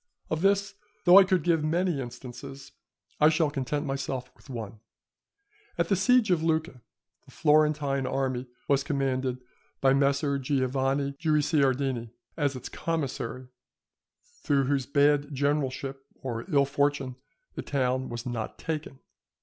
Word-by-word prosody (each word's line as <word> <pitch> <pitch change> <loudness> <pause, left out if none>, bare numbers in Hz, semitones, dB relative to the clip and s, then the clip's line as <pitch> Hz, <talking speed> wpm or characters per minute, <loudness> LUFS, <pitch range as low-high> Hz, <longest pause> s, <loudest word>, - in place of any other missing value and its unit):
Of 160 0 -1
this, 200 +1 +2 0.3
though 180 +2 +9
I - - +8
could 185 -3 +1
give 165 -2 +2
many 170 -1 0
instances, 135 +3 -9 0.5
I 150 - +7
shall 160 -2 +1
content 145 +1 -2
myself 135 -2 -3
with - - -21
one. 115 -3 -6 1.0
At - - 0
the 200 - +4
siege 215 +2 +3
of 170 -3 +3
Lucca 160 -5 -1 0.4
the - - -18
Florentine 150 -3 +2
army 130 -1 -1 0.2
was 140 -1 +3
commanded 130 -3 -1 0.4
by 135 -1 +4
Messer 140 +1 +2
Giovanni 135 +1 0
Guicciardini, 140 -6 +1 0.3
as 145 -4 0
its 130 - -6
commissary, 130 -6 -4 0.9
through 140 -2 +2
whose 135 -1 0
bad 145 0 +2
generalship 135 -1 -1
or 120 -3 -6
ill 140 -1 +4
fortune 140 -2 0 0.4
the - - -5
town 130 -1 -1
was 120 +1 -6
not 120 -3 -4
taken. 155 -4 -4
140 Hz, 135 wpm, -28 LUFS, 130-155 Hz, 1.0 s, though